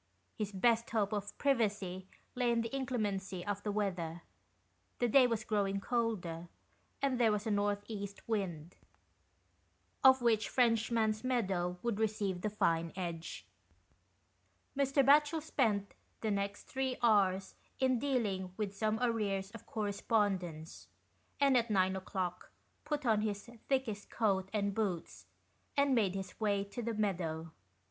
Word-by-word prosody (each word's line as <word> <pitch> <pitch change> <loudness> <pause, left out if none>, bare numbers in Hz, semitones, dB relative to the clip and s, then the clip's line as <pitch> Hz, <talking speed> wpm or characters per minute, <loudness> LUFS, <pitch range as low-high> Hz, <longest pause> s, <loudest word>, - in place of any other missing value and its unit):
His 210 -2 -3
best 230 +4 +2
hope 215 -2 0
of 205 -1 -4
privacy 205 -8 0 0.3
lay 245 -1 +1
in 235 0 +2
the 230 +4 -4
inclemency 205 -8 -2
of 205 -1 -2
the 210 - -2
weather; 175 -5 -2 0.7
the 245 - +2
day 255 +2 +6
was 230 -2 -1
growing 200 -3 0
colder, 195 -8 -2 0.6
and 265 -3 +1
there 230 -2 +5
was 210 +1 -1
a 220 - 0
north 205 0 +1
east 200 -2 -6
wind, 180 -7 -3 1.3
of 265 0 +8
which 225 -3 +3
Frenchman's 225 -2 +2
Meadow 190 -8 0
would 235 -3 -1
receive 205 -4 0
the 215 - 0
fine 165 -5 +1
edge. 170 -3 -5 1.3
Mr. 275 0 +3
Batchel 295 +3 +5
spent 220 -10 0 0.3
the 220 - 0
next 200 0 -2
three 265 -1 -2
hours 195 -4 +3 0.3
in 260 -2 +3
dealing 205 -9 -1
with 205 -2 -3
some 215 +1 0
arrears 205 -5 0
of 230 0 -11
correspondence, 200 -6 -1 0.5
and 275 -2 +4
at 235 -1 +3
nine 190 -2 +2
o'clock 185 -2 -4 0.4
put 295 -2 -2
on 220 -3 +3
his 205 0 -3 0.2
thickest 250 -7 -1
coat 195 -4 +1
and 200 -2 0
boots, 195 -6 -3 0.5
and 280 -1 +4
made 205 -6 +2
his 190 -1 -6
way 205 -2 +1
to 200 +5 -6
the 230 -1 -2
meadow. 165 -6 -2
210 Hz, 140 wpm, -34 LUFS, 195-235 Hz, 1.3 s, of